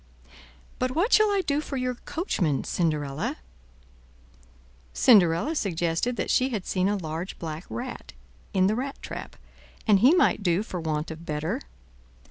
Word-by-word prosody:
"But 255 0 -1
what 385 +9 +2
shall 430 0 +6
I 400 -1 +2
do 285 +1 +1
for 280 -2 -5
your 255 0 -1
coachman, 215 - -1
Cinderella?" 155 - -1 1.6
Cinderella 195 - +5
suggested 175 - -1
that - - -2
she 260 +1 +3
had 215 -7 -3
seen 185 +1 +1
a 205 - 0
large 165 +1 -5
black 160 +1 -6
rat 250 +2 -6 0.4
in 190 -3 +3
the 200 - +3
rat 270 +3 -4
trap, - - -7 0.5
and 210 -3 +5
he 265 - +6
might 355 - +3
do 180 +1 +1
for 180 -5 -5
want 155 0 -2
of 160 +1 -8
better. 150 -1 -2
195 Hz, 150 wpm, -26 LUFS, 165-255 Hz, 1.6 s, shall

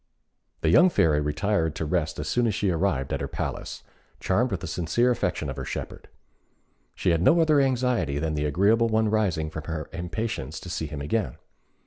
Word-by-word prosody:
The 80 - +2
young 180 - +7
Fairy 75 - +2
retired 80 +1 0
to 80 - -3
rest 75 -1 -1
as 75 - -4
soon 120 +5 +1
as 105 - 0
she 100 -2 +1
arrived 80 -6 0
at - - -2
her - - -2
palace, - - -5 0.4
charmed 115 +7 +1
with 95 -7 -3
the - - -5
sincere 90 +10 +1
affection 120 - -1
of - - -5
her - - -4
shepherd. - - -6 0.9
She - - +1
had 85 -1 +1
no 165 - +5
other 155 -3 +4
anxiety 125 - +1
than 80 +1 -1
the 75 0 -1
agreeable 100 +10 +3
one 110 0 +2
arising 95 -8 0
from 75 -1 -6
her 80 -2 -5
impatience 90 - -4
to 90 - -8
see 80 -2 -3
him 75 -1 -6
again. 75 - -1
90 Hz, 195 wpm, -26 LUFS, 75-110 Hz, 0.9 s, young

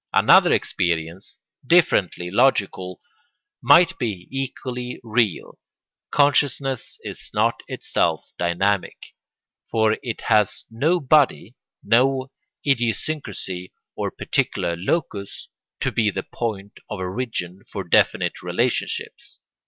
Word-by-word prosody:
Another - - +6
experience, 85 +2 -1 0.3
differently 105 - +2
logical, 100 -6 +1 0.6
might 165 +8 +5
be 105 -8 -3
equally 125 -2 -4
real. 110 -4 0 0.5
Consciousness 140 -3 +1
is - - -7
not - - +1
itself - - -1
dynamic, 95 +3 0 0.7
for 110 -1 +2
it 115 -3 -5
has 105 -2 +2
no 155 +10 +1
body, 140 - +2 0.3
no 130 +2 +2 0.3
idiosyncrasy 120 -7 -2 0.2
or - - -2
particular 85 - -1
locus, 100 - -3 0.3
to - - 0
be 110 -3 +2
the 95 -1 -3
point 105 -4 -5
of 105 - -4
origin 95 -1 -4
for 100 - -4
definite 85 - +2
relationships. - - -2
110 Hz, 100 wpm, -22 LUFS, 95-135 Hz, 0.7 s, Another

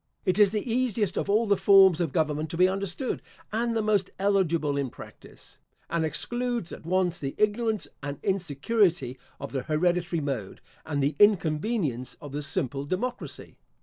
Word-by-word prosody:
It 185 +3 +2
is 205 -2 +7
the 210 +4 -3
easiest 230 -5 0
of - - -2
all 215 +3 +3
the 205 -2 +3
forms 190 -4 +6
of 165 -5 -1
government 155 -1 0
to 165 - -5
be 180 +1 +6
understood 195 +6 -2 0.3
and 230 +1 0
the 220 - 0
most 205 -3 +1
eligible 175 -7 +1
in 140 -2 -1
practice; - - -14 0.3
and 170 -1 +1
excludes 240 - -1
at - - -9
once 180 -1 +1
the 135 -1 -4
ignorance 215 0 0
and 145 0 -5
insecurity 175 - 0 0.2
of 140 - -6
the 135 - -2
hereditary 170 +3 0
mode, 135 -10 -4 0.3
and 145 -3 -1
the 145 +3 0
inconvenience 160 - +2
of 145 - -9
the 145 +1 -3
simple 140 -3 -2
democracy. 185 - -4
180 Hz, 165 wpm, -27 LUFS, 150-205 Hz, 0.3 s, is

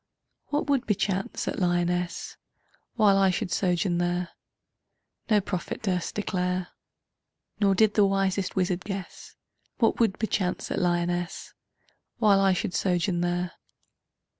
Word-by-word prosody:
What 295 0 -1
would 280 -3 +1
bechance 195 -2 -1
at - - -2
Lyonnesse 175 -1 -1 0.6
While 205 -4 +5
I 195 -1 +5
should 180 -1 -2
sojourn 180 -1 +1
there 175 0 -1 1.0
No 210 -2 +5
prophet 185 0 -4
durst 180 -4 -1
declare, 180 -3 -1 0.9
Nor 200 -2 +3
did 215 +1 +4
the 205 -2 +4
wisest 195 0 0
wizard 180 -1 0
guess 195 -2 -7 0.4
What 225 - +2
would 220 -5 +2
bechance 195 -4 -1
at - - 0
Lyonnesse 175 0 -1 0.6
While 210 -4 +4
I 195 -1 +4
should 180 +1 -2
sojourn 180 -1 0
there. 175 0 -1
185 Hz, 125 wpm, -27 LUFS, 175-200 Hz, 1.0 s, While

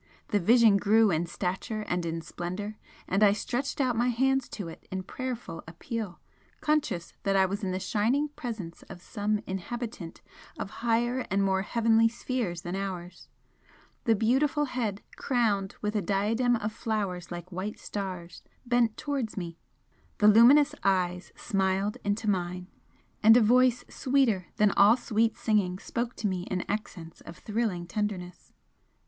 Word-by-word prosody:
The 205 - +2
Vision 225 +1 +5
grew 215 +1 +4
in 170 +1 0
stature 190 +5 -3
and 175 -4 -2
in 165 0 -3
splendour, 185 +6 -5 0.3
and 195 +3 +1
I 205 -2 +6
stretched 250 +7 -3
out 255 -3 +2
my 240 +2 +2
hands 265 +2 +1
to 200 -6 -6
it 165 - -11
in 190 0 -4
prayerful 245 -4 -5
appeal, 195 +3 -5 0.4
conscious 235 - -1
that 195 -1 0
I 190 0 +5
was 200 +3 -3
in 190 - -1
the 185 0 -2
shining 240 +10 +1
Presence 220 - -7
of - - -9
some 210 +2 -2
inhabitant 195 -1 -6 0.3
of 195 - -5
higher 240 +2 +1
and 195 +1 +1
more 190 -1 +2
heavenly 225 +1 +3
spheres 230 -6 -3
than 175 +1 -4
ours. 185 -2 -6 0.8
The 225 -2 +4
beautiful 275 +7 +2
head, 230 -6 -3
crowned 215 -7 0
with 210 +1 -1
a 210 - +2
diadem 215 +6 +1
of 215 -1 -3
flowers 200 -7 -3
like 175 +1 -7
white 190 +4 -4
stars, 185 -4 -6 0.2
bent 240 -2 +2
towards 275 -8 -3
me 170 -2 -5 0.6
the 210 - +4
luminous 240 +7 +7
eyes 180 -2 0
smiled 195 +1 0
into 205 +2 -1
mine, 180 -2 -1 0.6
and 225 +2 +8
a - - +7
voice 245 +2 +4
sweeter 250 - +1
than 210 -1 +4
all 205 +5 +6
sweet 225 -1 0
singing 210 -6 +1
spoke 235 +5 -4
to 215 - -2
me 185 -2 -2
in 185 -1 -2
accents 180 -6 -5
of 170 - -11
thrilling 210 -5 -2
tenderness. 180 -2 -4
210 Hz, 155 wpm, -28 LUFS, 185-235 Hz, 0.8 s, and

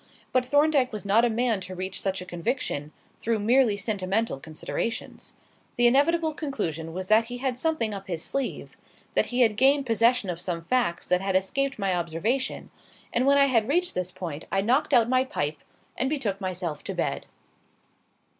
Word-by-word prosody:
But 250 -1 +1
Thorndyke 290 -2 +3
was 210 -2 -6
not 210 +4 +4
a - - +2
man 230 -3 0
to 185 0 -7
reach 185 +1 -3
such 190 -1 -1
a - - -7
conviction 175 - -3 0.3
through 230 0 +1
merely 225 0 +3
sentimental 205 - -1
considerations. 160 - -5 0.4
The 240 - +3
inevitable 315 +6 +3
conclusion 170 - -3
was 185 +2 -5
that 220 +1 +5
he 245 +1 -6
had 250 -1 -2
something 285 -9 0
up 195 -1 -7
his 170 -3 -3
sleeve 275 -2 -3 0.4
that - - +2
he 250 +1 0
had 225 -3 +4
gained 275 +4 +4
possession 230 -3 +2
of 170 0 -6
some 175 -2 -3
facts 205 -5 0
that 180 0 +1
had 195 -1 -1
escaped 275 +9 0
my 195 -3 0
observation; 175 +10 -2 0.4
and 250 +3 +2
when 280 0 +5
I 280 - +6
had 230 -5 +2
reached 350 +4 +1
this 180 0 -2
point 165 -4 -6
I 195 - +2
knocked 250 +8 +1
out 230 -2 +5
my 255 +1 +3
pipe 150 - -3 0.4
and 265 - 0
betook 220 -10 -2
myself 180 -5 -4
to - - -4
bed. - - -2
220 Hz, 185 wpm, -26 LUFS, 185-255 Hz, 0.4 s, I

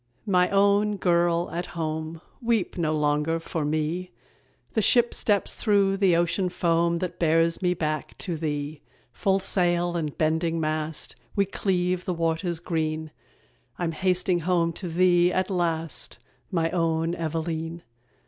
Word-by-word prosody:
_ - - -45 0.2
My 180 -3 +3
own 200 +1 +3
girl 170 -1 +2
at 175 0 -5
home, 160 0 -3 0.2
Weep 230 -5 0
no 165 -3 0
longer 150 +2 +1
for 165 -1 -3
me, 155 +4 -1 0.6
The 220 - +2
ship 240 +3 +4
steps 205 -2 +1
through 200 -2 +2
the 190 -3 +4
ocean 175 +2 +1
foam 170 -1 +1
That 180 +1 -4
bears 165 +1 +2
me 180 -1 +1
back 155 -2 -3
to 175 -4 -3
thee. 150 -1 -3 0.3
Full 195 +8 +1
sail 175 -2 +1
and 155 -4 -3
bending 160 +1 +1
mast, 155 0 -2 0.2
We 200 -1 +3
cleave 180 -2 -1
the 180 - -1
waters 165 +1 -1
green; 160 -2 -2 0.7
I'm 175 -2 -1
hasting 180 +1 +1
home 170 -1 +1
to 180 +1 -5
thee, 175 +1 +4
at 185 +2 0
last, 165 -3 -2 0.3
My 165 -2 0
own 165 -1 0
Eveleen. 165 0 -3
170 Hz, 145 wpm, -26 LUFS, 160-185 Hz, 0.7 s, ship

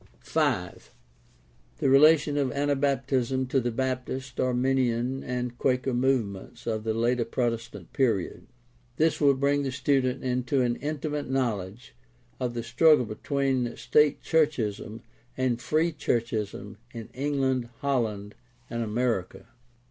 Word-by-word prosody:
5. - - -1 0.9
The - - 0
relation 145 +2 +5
of 140 -2 +1
Anabaptism 135 -2 0
to 135 - +2
the 120 -1 -1
Baptist, 130 +1 -3
Arminian, 130 0 +1
and 125 -1 -3
Quaker 130 0 +1
movements 120 -2 -1
of 110 -2 -2
the 110 0 -1
later 120 +1 +1
Protestant 115 -5 -3
period. 115 -9 0 0.2
— 120 -1 -35
This 160 0 +2
will 140 -2 +5
bring 140 +1 +1
the 135 -2 -2
student 130 -1 0
into 125 +1 0
an 120 -1 0
intimate 150 -1 -3
knowledge 115 -4 -2 0.5
of 125 -2 -2
the 115 - -3
struggle 150 +1 +4
between 130 +2 -1
state 150 -1 +2
churchism 115 -9 0 0.3
and 125 -2 0
Free 155 +6 +1
churchism 110 -7 -2
in 115 -2 -8
England, 130 -3 0
Holland, 110 -7 -1 0.4
and 115 0 -2
America. 115 -2 -2
125 Hz, 125 wpm, -27 LUFS, 115-135 Hz, 0.9 s, relation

